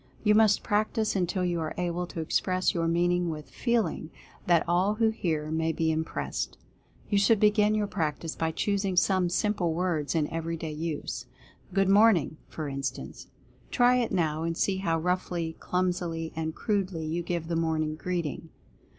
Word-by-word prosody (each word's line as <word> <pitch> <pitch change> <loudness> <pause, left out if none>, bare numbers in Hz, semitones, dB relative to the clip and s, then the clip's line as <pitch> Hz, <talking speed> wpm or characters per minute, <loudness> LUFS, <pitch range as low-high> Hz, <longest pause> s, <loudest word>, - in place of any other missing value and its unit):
You 210 -1 +5
must 215 -1 +4
practice 215 +1 0
until 180 0 0
you 175 -1 0
are 155 -1 -3
able 175 0 -2
to 165 - -5
express 185 +3 +1
your 165 -1 0
meaning 175 +1 +2
with 150 -2 -6
"feeling" 225 -10 0 0.4
that 170 -2 +3
all 185 +5 +2
who 225 0 +3
hear 155 -8 -2
may 160 0 +1
be 160 0 0
im 160 0 0
pressed. - - -4 0.5
You 200 - +4
should 200 +2 +4
begin 210 0 +4
your 210 -1 +1
practice 165 -4 -3
by 160 - 0
choosing 195 +2 -1
some 185 -1 +3
simple 175 -3 0
words 170 -4 -1
in 155 -2 +2
every 165 0 -2
day 160 -1 -5
use 155 0 -4 0.2
— - - -24
"Good 195 -1 +3
Morn 205 +1 +6
ing 155 0 -4
!" - - -35
for 155 -2 -5
instance. 135 -1 -5 0.4
Try 245 0 +4
it 240 -2 0
now, 160 -4 0
and 165 0 -2
see 195 -1 +1
how 170 -4 0
roughly, 175 -1 -1
clumsily 175 -3 -2
and 160 0 -3
crudely 190 -6 -1
you 165 +3 -2
give 170 -1 -3
the 170 - -1
morning 160 -2 0
greeting. 165 -2 -3
175 Hz, 180 wpm, -28 LUFS, 160-195 Hz, 0.5 s, Morn